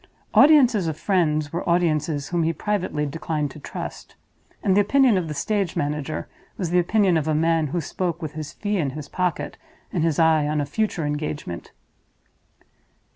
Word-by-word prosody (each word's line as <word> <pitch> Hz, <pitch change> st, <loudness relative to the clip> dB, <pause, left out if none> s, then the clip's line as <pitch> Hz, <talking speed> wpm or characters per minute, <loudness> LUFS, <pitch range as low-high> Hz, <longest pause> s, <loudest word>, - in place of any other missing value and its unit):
Audiences 260 Hz, -, +6 dB
of 155 Hz, -2 st, -3 dB
friends 155 Hz, -6 st, +1 dB
were 170 Hz, +1 st, -2 dB
audiences 155 Hz, -4 st, +1 dB
whom 175 Hz, -1 st, 0 dB
he 165 Hz, 0 st, +2 dB
privately 175 Hz, -3 st, -2 dB
declined 150 Hz, 0 st, -3 dB
to 150 Hz, -, -11 dB
trust; -, -, -7 dB, 0.5 s
and 190 Hz, -, +3 dB
the 205 Hz, -, +6 dB
opinion 260 Hz, +2 st, +4 dB
of 180 Hz, -3 st, 0 dB
the 150 Hz, -, -5 dB
stage 200 Hz, 0 st, -1 dB
manager 150 Hz, +1 st, -2 dB, 0.3 s
was 175 Hz, -4 st, -2 dB
the 180 Hz, -, +4 dB
opinion 185 Hz, 0 st, +3 dB
of 155 Hz, -1 st, -1 dB
a 155 Hz, -, +1 dB
man 165 Hz, 0 st, +2 dB
who 175 Hz, +5 st, -2 dB
spoke 170 Hz, +1 st, -3 dB
with 155 Hz, -4 st, -5 dB
his 155 Hz, -1 st, -6 dB
fee 205 Hz, -1 st, -2 dB
in 150 Hz, -6 st, 0 dB
his 150 Hz, -2 st, -7 dB
pocket 175 Hz, -3 st, -2 dB, 0.4 s
and 170 Hz, -, 0 dB
his 165 Hz, -3 st, +1 dB
eye 160 Hz, -2 st, +4 dB
on 150 Hz, 0 st, 0 dB
a 145 Hz, -, 0 dB
future 175 Hz, 0 st, -1 dB
engagement. 145 Hz, -, -4 dB
165 Hz, 180 wpm, -23 LUFS, 150-185 Hz, 0.5 s, Audiences